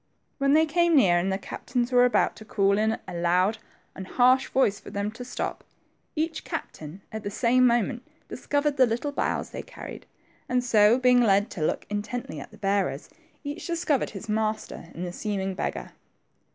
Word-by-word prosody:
When 275 0 +3
they 315 +1 +5
came 340 +1 +2
near, 180 -10 +5
and 190 +2 -1
the 190 - 0
captains 240 +5 -3
were 250 0 +6
about 245 - +2
to - - -10
call 200 -1 +1
in 220 +1 +1
a - - -6
loud 180 +5 +1 0.3
and 190 0 -8
harsh 255 +4 +3
voice 215 -7 +2
for - - -11
them 200 +1 -3
to 225 +3 -8
stop, 245 - -4 0.5
each 320 +1 -2
captain 160 +5 -7
at 220 - -5
the 205 - -4
same 250 +4 +3
moment 240 +1 +1 0.3
discovered 290 0 -1
the 255 -2 +6
little 240 +6 -2
boughs - - -2
they - - -5
carried, - - -10 0.4
and 250 0 +1
so, 220 -1 +5
being 250 -1 +4
led 205 -1 +3
to 175 - -6
look - - -1
intently 210 -4 -4
at - - -9
the - - -16
bearers, 195 -7 -1 0.3
each 290 +3 -6
discovered 330 -5 0
his 200 +1 -9
master 215 -5 -2
in 175 - -5
the 175 -1 -5
seeming 195 -1 -2
beggar. 185 - -4
220 Hz, 185 wpm, -26 LUFS, 195-255 Hz, 0.5 s, were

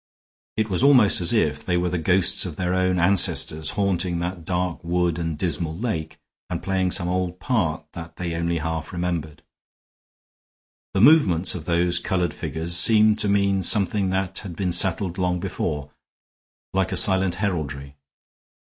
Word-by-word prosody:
It 110 -1 0
was 95 -1 0
almost 130 -9 +5
as 85 - +4
if 75 -10 0
they 90 -1 -1
were 90 0 -1
the 90 - -2
ghosts 90 +3 +2
of 90 -5 -6
their 90 +1 -2
own 95 0 +1
ancestors 85 -4 +2
haunting 95 -3 0
that 85 -1 -5
dark 90 -1 -3
wood 85 -1 -1
and 80 -2 -3
dismal 80 -1 -2
lake, 100 -8 -4 0.3
and - - -5
playing 95 -1 0
some 90 0 +1
old 90 0 -2
part 85 -9 -1
that 85 -1 -10
they 85 -2 -4
only 85 +1 -2
half 80 0 -4
remembered. 85 -4 -4 1.5
The 95 - +2
movements 100 - +4
of 80 -4 -7
those 85 0 +1
colored 90 -2 -2
figures 80 +2 -3
seemed 110 +4 +5
to 105 - +1
mean 100 -1 +1
something 100 +1 +2
that 95 0 -2
had 95 -5 -8
been 90 0 -2
settled 90 +1 0
long 90 -1 0
before, 75 -3 -4 0.8
like 95 0 0
a - - -2
silent 95 -2 +4
heraldry. 75 -8 -4
90 Hz, 160 wpm, -23 LUFS, 85-95 Hz, 1.5 s, almost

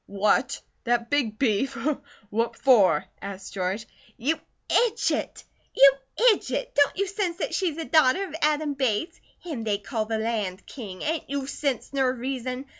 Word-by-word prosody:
"What? 200 +1 +1 0.3
That 235 0 0
big 245 -7 +1
beef! 250 +1 +1 0.5
What 230 +2 0
for?" 205 - +5 0.2
asked 195 -1 -7
George. 195 +3 -2 0.3
"You 290 +7 0 0.3
idjit! 465 -1 +1 0.3
You 275 0 +8 0.4
idjit! - - -4
Don't 285 0 +3
you 400 - +1
sense 380 -3 -2
that - - -3
she's 345 -5 0
a 325 - -3
daughter 310 +2 +4
of - - -12
Adam 300 0 +2
Bates? 265 - -1 0.2
Him 305 -10 -5
they 210 -2 0
call 215 +2 -3
the 220 0 -1
Land 215 -4 -2
King. 200 -8 -8
Ain't 320 0 -2
you 280 -1 -2
sense 275 -2 -2
ner 265 -2 +2
reason? 255 +1 -4
255 Hz, 155 wpm, -26 LUFS, 215-300 Hz, 0.5 s, You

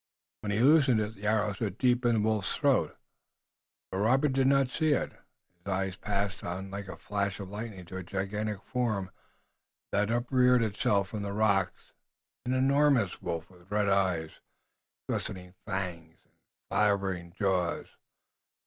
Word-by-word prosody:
When 105 - -5
he 105 +3 +1
loosed 145 +2 +6
it 110 -3 +2
the 105 0 -6
arrow 105 -1 +2
stood 100 -1 -3
deep 125 -1 +3
in 120 - +3
the 110 - +2
wolf's 110 -2 0
throat, - - +2 0.9
but 95 - -2
Robert 130 +7 +3
did 135 0 +3
not 135 -1 +4
see 155 0 +2
it. - - -1 0.5
His 90 - -18
eyes 95 0 -1
passed 100 -1 -2
on 95 +2 -5
like 100 0 -5
a 95 - -7
flash 100 -1 -2
of 95 -1 -7
lightning 105 -3 -6
to 95 +2 -7
a 95 - -5
gigantic 100 +2 -3
form 110 -5 -1 0.8
that 105 +1 +1
upreared 125 +1 +3
itself 100 -2 +1
from 110 - -4
the 100 0 -3
rocks, 100 -3 0 0.5
an 125 - +1
enormous 135 -5 +3
wolf 85 +2 -4
with 90 0 -19
red 105 -1 +1
eyes, 95 -5 +1 0.7
glistening 90 -3 -4
fangs 90 -5 -4
and - - -37 0.4
slavering 95 -4 +1
jaws. 95 -3 0
100 Hz, 155 wpm, -30 LUFS, 95-115 Hz, 0.9 s, loosed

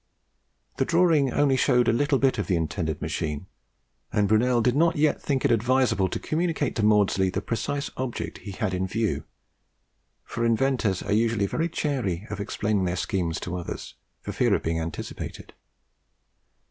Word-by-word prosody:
The - - +1
drawing 165 -6 +3
only 140 0 +3
showed 125 -2 +3
a - - +4
little 140 +3 +2
bit 130 -3 +2
of 105 - -2
the 95 - +2
intended 80 -1 -2
machine, 75 +2 -3 0.7
and 105 -2 +2
Brunel 120 +4 +3
did 120 +2 +2
not 165 +3 +3
yet 150 +1 +2
think 135 -3 -1
it - - +3
advisable 115 -4 +2
to - - -3
communicate 160 -2 -1
to 110 - 0
Maudslay 100 -3 +3
the 95 - -2
precise 140 +7 -3
object 130 -2 -4
he - - -9
had 100 0 -2
in 95 +1 -1
view; 110 +2 -1 1.0
for 115 +2 -4
inventors 115 -4 +1
are 100 - -1
usually 110 -1 +2
very 165 - -1
chary 120 - -2
of 105 - -4
explaining 100 -1 -1
their 90 0 -1
schemes 85 -2 -1
to 90 - -4
others, 90 -1 -6 0.3
for - - -5
fear - - +2
of - - -3
being 80 0 -1
anticipated. 80 -1 -6
110 Hz, 170 wpm, -26 LUFS, 95-135 Hz, 1.0 s, a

